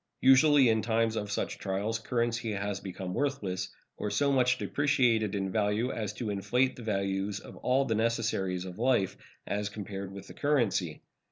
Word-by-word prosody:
Usually 135 0 +6
in 110 -1 +3
times 115 0 +1
of 105 -2 -3
such - - -2
trials 100 +3 -2
currency 115 -1 -1
has 100 -1 -2
become 95 -2 -6
worthless, 100 -10 -2 0.3
or 105 - -2
so 140 +8 +2
much 125 -1 +3
depreciated 120 -9 +1
in 95 -1 -2
value 110 +4 +1
as 105 -3 -3
to 110 0 -3
inflate 125 +6 +1
the - - -10
values 100 -2 -1
of - - -12
all 130 +2 +2
the 115 - 0
necessaries 110 -5 0
of 90 +2 -8
life 120 -6 +2 0.3
as 105 0 -2
compared 100 -2 -6
with 100 0 -9
the - - -11
currency. 115 - 0
110 Hz, 170 wpm, -30 LUFS, 100-120 Hz, 0.3 s, Usually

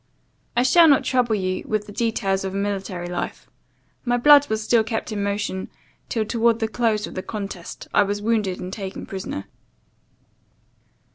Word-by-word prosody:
I 245 - +5
shall 330 +6 +6
not 280 -3 +5
trouble 245 -4 +2
you 185 -2 -2
with 215 -1 -1
the 205 - -10
details 200 -3 0
of 190 0 -4
a - - -1
military 195 -3 -3
life. 175 0 -5 0.6
My 245 -1 +1
blood 290 +3 +7
was 220 0 -1
still 225 0 +3
kept 225 0 -3
in 210 -1 -2
motion; 200 -2 -2 0.4
till, 220 -2 0
towards 230 +1 +2
the 225 -1 -1
close 220 -2 0
of - - -9
the 185 - -3
contest, 195 -3 -7
I - - +5
was 205 0 0
wounded 210 -4 0
and 185 +1 -6
taken 195 -2 -6
prisoner. 190 - -5
210 Hz, 170 wpm, -23 LUFS, 195-230 Hz, 0.6 s, blood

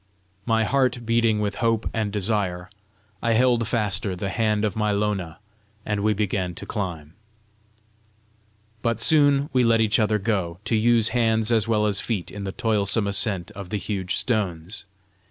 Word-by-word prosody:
My 115 0 +2
heart 125 0 0
beating 115 -2 +2
with 100 -1 -2
hope 115 -1 +1
and 110 -2 -1
desire, 95 -3 -1 0.5
I 115 -1 +1
held 120 -1 +2
faster 105 -4 -1
the 95 +2 -4
hand 110 -1 +1
of 105 - -2
my 105 -1 0
Lona, 100 -5 -2 0.5
and 105 -1 -1
we 105 +1 +1
began 95 -3 -2
to - - -8
climb; 85 -7 -5 1.7
but 115 -1 -1
soon 145 +2 +3
we 125 -1 +3
let 115 -1 +3
each 110 -1 +2
other 110 -1 +2
go, 95 -5 -2
to 115 - +1
use 115 0 +3
hands 110 -2 +1
as 110 -3 +2
well 105 -2 +2
as 100 -2 +1
feet 100 -8 -3
in 100 -1 -6
the 95 - -3
toilsome 110 -2 +1
ascent 100 -2 -1
of 100 -3 -9
the 105 - -2
huge 95 -2 -3
stones. 95 -6 -2
105 Hz, 165 wpm, -24 LUFS, 100-115 Hz, 1.7 s, soon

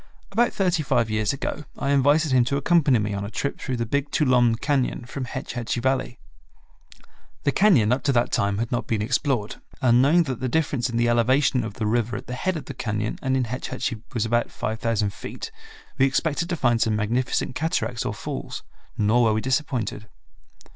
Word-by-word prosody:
About 235 +4 +2
thirty 180 -4 +1
five 115 -6 +1
years 110 -1 +1
ago 140 +2 -4
I 140 - -1
invited 145 +2 +3
him 130 -1 +5
to 140 +3 0
accompany 145 -3 +3
me 105 -1 -1
on 100 0 -3
a 100 - -4
trip 140 +6 -3
through 130 -2 -3
the 115 - -1
Big 140 +5 -1
Tuolumne 125 -5 +3
Cañon 130 -1 -1
from 130 +2 -5
Hetch 130 +3 -6
Hetchy 120 -1 -2
Valley. 130 0 -1 1.3
The 140 - +2
cañon 140 - +4
up 130 - -1
to 140 - +3
that 120 0 +2
time 100 0 +1
had 115 +1 -2
not 120 - -1
been 110 -2 0
explored, 120 -2 0 0.2
and 125 -3 +4
knowing 160 +6 +5
that 130 -6 -4
the 130 - -2
difference 140 -5 0
in 115 - -2
the 120 0 +2
elevation 125 +2 +3
of 110 -2 -6
the 110 - -3
river 120 +1 0
at - - -8
the 125 - -6
head 180 +7 -1
of 155 - -7
the 135 - -7
cañon 110 -3 -3
and 130 -1 +1
in 130 - +1
Hetch 125 +2 -4
Hetchy 125 -4 -3
was 115 -3 -1
about 120 +1 +1
5000 110 -2 -1
feet, - - -7 0.5
we 135 - +5
expected 160 +5 0
to 175 - 0
find 120 -6 +2
some 110 -1 +2
magnificent 120 +5 -1
cataracts 150 -5 -1
or - - -3
falls; - - -6 0.3
nor 110 +3 +3
were 110 - +3
we 110 - 0
disappointed. 130 -5 -2
125 Hz, 205 wpm, -24 LUFS, 115-140 Hz, 1.3 s, him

